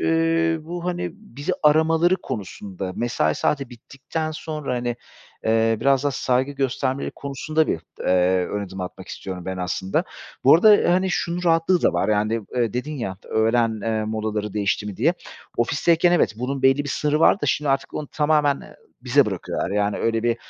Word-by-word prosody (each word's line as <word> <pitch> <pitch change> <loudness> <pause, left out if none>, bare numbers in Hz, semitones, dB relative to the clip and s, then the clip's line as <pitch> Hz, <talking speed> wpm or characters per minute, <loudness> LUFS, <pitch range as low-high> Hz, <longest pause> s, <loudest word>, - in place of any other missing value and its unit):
ııı, 165 0 +1
bu, 175 +1 -6
hani, 175 -1 -2
bizi 170 - -5
aramaları 160 +4 +4
konusunda, 95 -2 -6
mesai 80 -10 0
saati 140 -3 -1
bittikten 135 +6 -5
sonra, 155 -4 -4
hani, 120 -1 -2 0.5
eee, 115 0 +2
biraz 140 0 +3
daha 145 - +2
saygı 130 +1 0
göstermeleri 135 0 -1
konusunda 150 +3 -1
bir, 80 - -1 0.2
eee, 90 0 +2
ön 105 0 -3
adım 95 0 -8
atmak 90 - -7
istiyorum 90 -2 -7
ben 95 0 -4
aslında. 90 +1 -1 0.4
Bu 135 - +8
arada, 205 0 +6
hani, 185 +1 +1
şunun 175 0 -2
rahatlığı 165 +1 +3
da - - +3
var - - 0
yani, 110 +1 +1 0.2
eee, 115 -4 +1
dedin 135 +5 -3
ya, 95 -7 -4
"Öğlen, 110 0 +1
eee, 110 -1 -1
molaları 105 -1 -3
değişti 105 0 0
mi?" 100 - -6
diye. 160 +10 +2 0.4
Ofisteyken 165 +8 +2
evet, 175 - +3
bunun 130 +2 -3
belli 135 +2 +4
bir - - -5
sınırı 150 +2 0
vardı 195 - +4
da - - +1
şimdi 150 -2 0
artık 135 +1 0
onu 150 - -4
tamamen, 150 -2 +2
eee, - - -14 0.3
bize - - +3
bırakıyorlar - - -3
yani 105 0 0
öyle 115 0 0
bir, 120 0 +1
135 Hz, 175 wpm, -23 LUFS, 110-155 Hz, 0.5 s, Bu